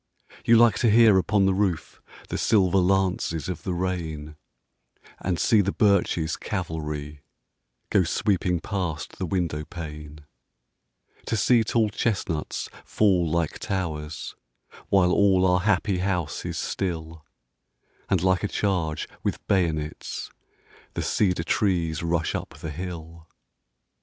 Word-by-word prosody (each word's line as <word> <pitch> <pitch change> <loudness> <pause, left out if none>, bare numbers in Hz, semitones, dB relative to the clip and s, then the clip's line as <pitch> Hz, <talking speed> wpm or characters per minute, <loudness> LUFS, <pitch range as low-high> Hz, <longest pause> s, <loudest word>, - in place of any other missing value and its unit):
You 115 - +6
like 115 -4 +5
to 115 - +3
hear 110 -3 +6
upon 95 +2 +2
the 95 - +3
roof 95 -4 -1 0.3
The - - -2
silver 95 -3 +3
lances 90 -4 +1
of 90 - -4
the 90 -2 -3
rain, 80 -4 -3 0.8
And 90 -2 -1
see 110 +3 +4
the 100 0 0
birches' 90 -6 +2
cavalry 75 -6 -4 0.7
Go 95 - +4
sweeping 90 0 0
past 85 -8 -4
the 95 - -2
window 85 -4 -1
pane: 75 -2 -9 1.0
To 115 - 0
see 115 +3 +4
tall 110 0 +1
chestnuts 95 -8 -2 0.2
fall 90 -6 +2
like 85 0 -1
towers, 80 -5 -4 0.6
While 95 -2 +4
all 95 -1 +4
our 90 0 +4
happy 95 -1 +1
house 90 -5 -2
is - - -3
still, 80 -4 -4 0.9
And 95 -3 +2
like 95 0 +2
a - - +1
charge 90 -7 -1
with - - -3
bayonets 80 -5 -1 0.6
The - - -2
cedar 90 -5 +1
trees 85 -4 0
rush 85 -1 0
up - - -5
the 80 - -5
hill. 85 0 -7
90 Hz, 125 wpm, -25 LUFS, 80-95 Hz, 1.0 s, You